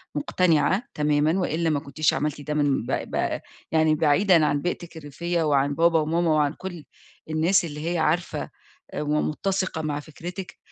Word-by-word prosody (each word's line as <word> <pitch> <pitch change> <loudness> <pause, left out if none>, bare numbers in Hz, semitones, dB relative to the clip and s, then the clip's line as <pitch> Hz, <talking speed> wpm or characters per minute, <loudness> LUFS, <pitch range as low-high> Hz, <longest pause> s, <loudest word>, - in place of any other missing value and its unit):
مقتنعة 165 - +2
تمامًا 150 +4 +2
وإلا 165 -2 0
ما 145 -2 +1
كُنتيش 155 +1 0
عملتِ 150 -1 -2
ده 150 +1 -4
من 145 -5 +1
ب 130 - -4
ب - - -1 0.3
يعني 160 -1 +3
بعيدًا 160 +2 +4
عن 145 -1 +1
بيئتِك 175 -1 -4
الريفية 165 +3 -2
وعن 140 -1 +2
بابا 165 -1 +4
وماما 165 +2 +1
وعن 150 -1 +2
كل 175 -5 -8 0.5
الناس 165 +4 +2
اللي 150 +1 -4
هي - - 0
عارفة، 160 +2 0 0.4
آآ، - - -3
ومُتسِقة 160 +3 -1
مع 150 -1 -2
فكرتِك، 175 +5 -8
155 Hz, 155 wpm, -25 LUFS, 150-170 Hz, 0.5 s, بعيدًا